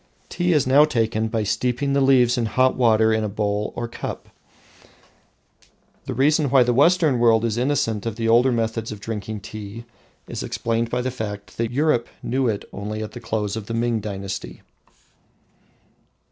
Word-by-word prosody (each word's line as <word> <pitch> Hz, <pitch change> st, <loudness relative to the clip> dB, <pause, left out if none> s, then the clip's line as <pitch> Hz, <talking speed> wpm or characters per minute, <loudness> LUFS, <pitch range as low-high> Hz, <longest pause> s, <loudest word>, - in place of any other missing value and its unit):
Tea 175 Hz, 0 st, 0 dB
is 150 Hz, -4 st, +3 dB
now 135 Hz, +3 st, +6 dB
taken 115 Hz, -6 st, 0 dB
by 110 Hz, -1 st, -1 dB
steeping 125 Hz, +6 st, -1 dB
the 140 Hz, -, +2 dB
leaves 125 Hz, -3 st, +4 dB
in 120 Hz, -3 st, 0 dB
hot 130 Hz, +3 st, +2 dB
water 110 Hz, -2 st, +3 dB
in 110 Hz, 0 st, 0 dB
a 105 Hz, -, -2 dB
bowl 105 Hz, 0 st, -2 dB
or 120 Hz, -, -3 dB
cup. 115 Hz, -, -7 dB, 1.8 s
The -, -, -4 dB
reason 145 Hz, +3 st, +2 dB
why 130 Hz, -1 st, +5 dB
the 120 Hz, 0 st, +1 dB
Western 155 Hz, -1 st, +3 dB
world 115 Hz, -1 st, +4 dB
is 110 Hz, -2 st, -1 dB
innocent 120 Hz, -4 st, 0 dB
of 115 Hz, -, -3 dB
the 115 Hz, 0 st, -2 dB
older 120 Hz, +3 st, +4 dB
method 115 Hz, -1 st, -2 dB
of 105 Hz, -, -7 dB
drinking 105 Hz, 0 st, -5 dB
tea 110 Hz, +2 st, -8 dB, 0.4 s
is -, -, -5 dB
explained 115 Hz, 0 st, -2 dB
by 125 Hz, +1 st, -1 dB
the 130 Hz, -, -2 dB
fact 105 Hz, -4 st, -6 dB
that 115 Hz, 0 st, -1 dB
Europe 125 Hz, -2 st, +1 dB, 0.2 s
knew 130 Hz, 0 st, 0 dB
it 105 Hz, -3 st, -2 dB
only 105 Hz, +2 st, -4 dB
at 105 Hz, -, -7 dB
the 120 Hz, -, -9 dB
close 110 Hz, -3 st, -2 dB
of 110 Hz, -2 st, -6 dB
the 115 Hz, -, -3 dB
Ming 115 Hz, -1 st, 0 dB
dynasty. 100 Hz, -2 st, -6 dB
115 Hz, 175 wpm, -22 LUFS, 110-130 Hz, 1.8 s, now